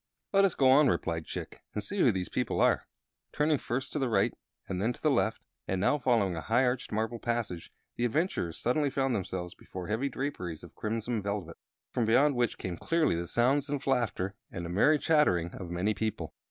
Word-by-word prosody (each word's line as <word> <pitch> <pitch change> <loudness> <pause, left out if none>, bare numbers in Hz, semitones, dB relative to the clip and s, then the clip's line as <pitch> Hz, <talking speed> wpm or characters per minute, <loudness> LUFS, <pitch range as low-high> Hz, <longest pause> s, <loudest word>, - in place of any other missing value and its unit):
"Let 195 0 +6
us 190 - +1
go 135 - +4
on," 145 +2 +6
replied 85 -9 -1
Chick, - - -6
"and 105 - -1
see 200 - -3
who 125 - +5
these 95 -3 -2
people - - -1
are." - - +3 0.4
Turning 150 -1 +2
first 130 +3 -3
to 150 - -1
the 135 -3 0
right 115 - +2 0.3
and 95 -1 -3
then 115 +4 +1
to 155 - 0
left, 115 -4 +1 0.2
and 95 - -1
now 145 +9 +2
following 115 -8 +2
a 80 - -4
high 120 +7 +2
arched 125 0 -1
marble 110 +2 -1
passage, 115 -8 -3 0.3
the 120 - +1
adventurers 120 - -1
suddenly 140 +4 +1
found 135 -2 0
themselves 90 -4 -3
before 90 0 -8
heavy 120 +6 0
draperies 105 - -4
of - - -12
crimson 115 +1 -2
velvet, 100 -5 -4 0.3
from 120 - 0
beyond 135 +6 +4
which 120 -2 0
came 90 -2 -4
clearly 165 - +1
the 85 +1 -3
sounds 135 - +2
of 140 -1 -3
laughter 110 -8 0 0.2
and 85 - -6
the - - -5
merry 145 - +4
chattering 115 - +2
of 90 - -7
many 90 +5 0
people. 110 0 -3
115 Hz, 205 wpm, -30 LUFS, 95-135 Hz, 0.4 s, Let